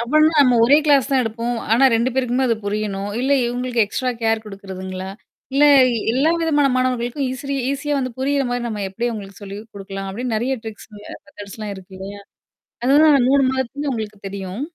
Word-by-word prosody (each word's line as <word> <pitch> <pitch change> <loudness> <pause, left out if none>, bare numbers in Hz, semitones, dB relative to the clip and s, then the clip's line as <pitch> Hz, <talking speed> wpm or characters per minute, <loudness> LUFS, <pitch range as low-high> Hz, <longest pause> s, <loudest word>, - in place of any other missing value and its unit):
அப்டின்னா 310 +6 +3
நம்ம 250 -3 +4
1 280 +5 +6
கிளாஸ் 280 -3 +4
தான் 265 -2 +3
எடுப்போம். 230 +1 -3 0.2
ஆனா 245 +4 +5
2 235 +3 +1
பேருக்குமே 260 0 +1
அது 230 - +2
புரியணும். 205 -1 -3
இல்ல 265 +2 -1 0.2
இவங்களுக்கு 245 -1 0
எக்ஸ்ட்ரா 255 +4 -2
கேர் 225 0 +1
குடுக்குறதுங்களா? 190 -2 -7 0.4
இல்ல 290 +1 +5 0.5
எல்லா 280 +6 +2
விதமான 295 -3 +2
மாணவர்களுக்கும் 255 +1 -1
ஈஸிரி 275 +2 -4 0.2
ஈஸியா 290 +1 -2
வந்து 255 -2 -3
புரியிற 275 +1 +1
மாரி 245 0 -2
நம்ம 210 -3 -4
எப்டி 235 +5 -2
அவங்களுக்கு 200 -2 -8
சொல்லி 200 0 -7 0.2
குடுக்கலாம் 195 0 -6
அப்டின்னு 240 +3 -3
நெறைய 255 +4 0
ட்ரிக்ஸ் 220 -1 -9
மெதர்ட்ஸ்லாம் 205 +1 -9
இருக்கு 190 0 -13
இல்லையா? 200 +1 -8 0.6
அதுதான் 280 0 +5
3 280 0 +4
மாதத்துல 265 +3 -3
உங்களுக்கு 215 -3 -5
தெரியும். 195 +3 -6
235 Hz, 165 wpm, -20 LUFS, 205-265 Hz, 0.6 s, 1